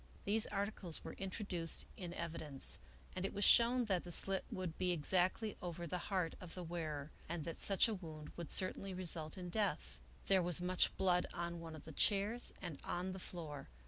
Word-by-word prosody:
These 215 +2 +3
articles 200 -4 -2
were - - -6
introduced 190 -4 -1
in 175 -3 -6
evidence, 160 -5 -4 0.4
and 185 - -2
it 195 - -2
was 205 - 0
shown 240 +1 +6
that 190 -5 0
the 175 - -8
slit 190 +2 +7
would 180 -4 -4
be 180 -1 +2
exactly 185 +6 +1
over 175 -1 -4
the 180 +2 -2
heart 185 -5 0
of 180 -3 -9
the 180 - -5
wearer, 155 -4 -4 0.2
and 165 -2 -3
that 165 - -5
such 195 +2 +4
a 225 - -1
wound 160 -6 -8
would 170 -3 -6
certainly 190 0 0
result 170 -2 0
in 180 -1 -5
death. 65 - -1 0.3
There 190 -1 +4
was 175 0 +3
much 180 +1 +2
blood 180 -2 +3
on 170 0 -3
one 165 -1 -7
of 155 - -11
the 160 - -8
chairs 210 +8 +2
and 155 -5 -5
on 180 +2 -2
the 190 - -6
floor. 160 -6 -7
180 Hz, 195 wpm, -38 LUFS, 165-195 Hz, 0.4 s, slit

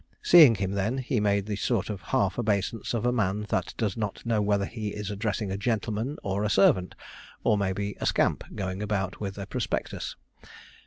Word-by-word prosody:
Seeing 155 -9 +8
him 95 -1 -2
then, 100 +6 -1
he 130 -2 -1
made 100 -1 +1
the 105 -1 -3
sort 110 -1 -1
of 100 -3 -6
half 95 +2 0
obeisance 110 +1 -1
of 115 - -1
a 125 - +3
man 105 -3 0
that - - -1
does 105 -5 -1
not 105 -1 -4
know 115 -2 +1
whether 100 -1 +1
he 110 0 -5
is 105 -1 -4
addressing 105 -1 -2
a 95 - -3
gentleman 115 +4 -1
or 100 +1 -1
a 105 - +1
servant, 95 -2 +3 0.5
or, - - +4
maybe, 100 0 -2
a - - 0
scamp, - - +1
going 95 0 -3
about 100 -3 -2
with 100 -2 -5
a 100 - -5
prospectus. - - -3
105 Hz, 195 wpm, -27 LUFS, 100-110 Hz, 0.5 s, Seeing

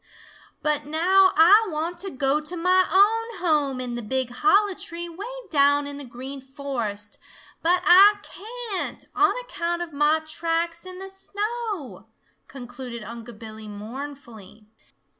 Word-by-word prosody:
"But 300 -1 0
now 375 +5 +4
Ah 400 +7 +7
want 335 +2 -3
to 390 +2 -4
go 275 0 +1
to 305 +4 -4
mah 365 +2 +3
own 445 +3 +3
home 300 -7 +1
in 250 -1 -3
the 240 - -4
big 255 +3 -2
hollow 405 +8 +3
tree 345 -1 -5
way 355 +6 -8 0.2
down 285 -1 +4
in 285 0 -5
the 285 - -5
Green 265 +2 -7
Forest, 245 -7 -5 0.4
but 355 +2 +2
Ah 400 +3 +7
can't, 450 -2 -5
on 400 +3 +3
account 345 -7 -3
of 335 -3 -10
mah 295 +2 +3
tracks 330 +2 -2
in 365 0 -8
the 385 +1 -7
snow," 410 - -5 0.4
concluded 245 -2 -8
Unc' 230 +1 -9
Billy 220 0 -9
mournfully. 220 -1 -9
310 Hz, 140 wpm, -24 LUFS, 260-375 Hz, 0.4 s, Ah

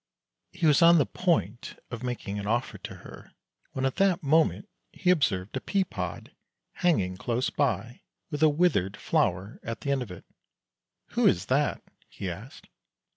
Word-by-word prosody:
He 170 - -2
was 150 0 +5
on 170 +1 +8
the 145 - +4
point 120 - -1
of 115 -2 -5
making 120 -5 -4
an 100 - -5
offer 120 +4 -1
to - - -8
her - - -12 0.4
when 130 - -1
at 135 - -1
that 195 -4 +2
moment 160 +7 +2 0.2
he 180 - +2
observed 110 - +1
a 130 - -2
pea 195 -1 +1
pod 90 - -6 0.5
hanging 95 - +2
close 120 +5 -1
by, 120 -4 -1 0.3
with 145 -1 -3
a 155 - +7
withered 145 - +1
flower 95 +4 0
at 115 -2 -6
the 140 - -1
end 135 -1 +1
of 120 - -5
it. 90 - -10 0.5
" - - -61
Who - - +3
is - - +2
that? - - +1 0.2
" - - -31
he 95 -2 -5
asked. 110 +10 -10
125 Hz, 180 wpm, -28 LUFS, 100-155 Hz, 0.5 s, on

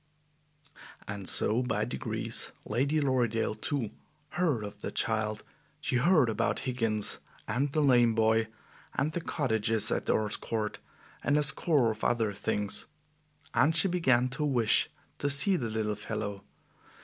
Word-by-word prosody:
And 100 -2 -4
so 115 +4 +2
by 125 - -1
degrees - - -2
Lady 140 +8 +1
Lorridaile, 125 -6 +1
too, 115 0 -2 0.4
heard 155 -11 0
of 105 0 -8
the - - -3
child; 110 -1 0 0.4
she 125 - 0
heard 155 0 +4
about 115 +1 0
Higgins 115 -5 0 0.3
and 135 +3 0
the 155 +1 +1
lame 120 -4 +4
boy, 110 0 +3 0.5
and 150 - 0
the 175 - -3
cottages 110 -9 0
at - - -1
Earl's 105 -1 +1
Court, 110 -2 -3 0.4
and 145 - +2
a 150 - +3
score 140 -3 +3
of 110 - -8
other 115 -4 +1
things, 105 0 -2 0.7
and 160 +2 +3
she 170 +4 +5
began 135 -9 +3
to 135 +4 -3
wish 120 -7 +2 0.3
to 145 - 0
see 150 +8 +3
the 120 -9 -2
little 110 -1 -1
fellow. 100 -1 -5
120 Hz, 145 wpm, -30 LUFS, 110-145 Hz, 0.7 s, she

